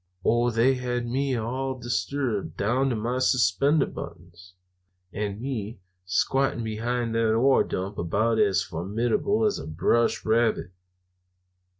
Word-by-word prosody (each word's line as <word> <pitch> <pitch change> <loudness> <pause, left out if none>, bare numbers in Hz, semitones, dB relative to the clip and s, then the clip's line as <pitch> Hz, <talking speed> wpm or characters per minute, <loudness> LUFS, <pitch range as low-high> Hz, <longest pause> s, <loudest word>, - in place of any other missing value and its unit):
Oh, 120 +1 +3
they 120 +3 +3
had 125 -1 -2
me 130 +2 -1
all 130 +3 -3
distributed, 115 - -2
down 125 +7 +1
to 125 - -1
my 120 +4 -2
suspender 130 - +3
buttons! 90 +2 -10 0.6
And 105 0 -3
me 115 -4 -4 0.3
squatting 120 +6 +1
behind 115 +2 -2
that 115 -1 +2
ore 130 +4 +4
dump 95 +3 -4
about 110 +7 +1
as 100 -3 +3
formidable 115 - 0
as 205 -2 +1
a - - -7
brush 115 +9 +1
rabbit! 110 -4 +1
115 Hz, 125 wpm, -26 LUFS, 105-130 Hz, 0.6 s, ore